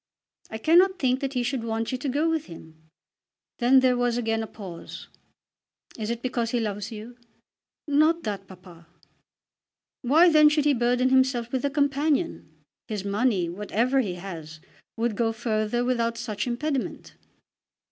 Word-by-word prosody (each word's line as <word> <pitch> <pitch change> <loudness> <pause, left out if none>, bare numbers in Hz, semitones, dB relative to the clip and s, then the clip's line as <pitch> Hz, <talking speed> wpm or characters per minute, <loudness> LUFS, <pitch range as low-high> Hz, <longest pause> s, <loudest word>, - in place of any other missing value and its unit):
"I 220 - -5
cannot 355 - +4
think 260 -4 +1
that 275 -1 -3
he 250 -2 0
should 250 -1 -2
want 225 +1 -2
you 255 - -2
to 275 - -3
go 295 +5 +1
with 325 -2 -1
him." 160 -2 -14 0.7
Then 260 +2 +5
there 255 -1 +3
was 245 -1 0
again 225 -2 0
a 220 - -4
pause. 185 -7 -10 0.9
"Is 215 -1 -4
it 235 0 -4
because 245 -3 -1
he 240 - 0
loves 210 -1 -3
you?" 225 +3 -9 0.7
"Not 310 +3 +3
that, 200 -2 -4
papa." 180 -3 -15 1.1
"Why 305 +8 +5
then 305 -2 +6
should 300 -1 +1
he 295 - +4
burden 245 +1 +2
himself 260 -3 +2
with 260 0 -2
a - - +2
companion? 290 +3 0 0.4
His 210 -3 -4
money, 200 -3 +1
whatever 210 +8 0
he 200 -8 -1
has, 165 -4 -8 0.4
would 230 -1 -1
go 225 +1 +1
further 220 +1 -1
without 235 -2 0
such 215 0 -4
impediment." 265 +2 -3
240 Hz, 155 wpm, -25 LUFS, 215-270 Hz, 1.1 s, then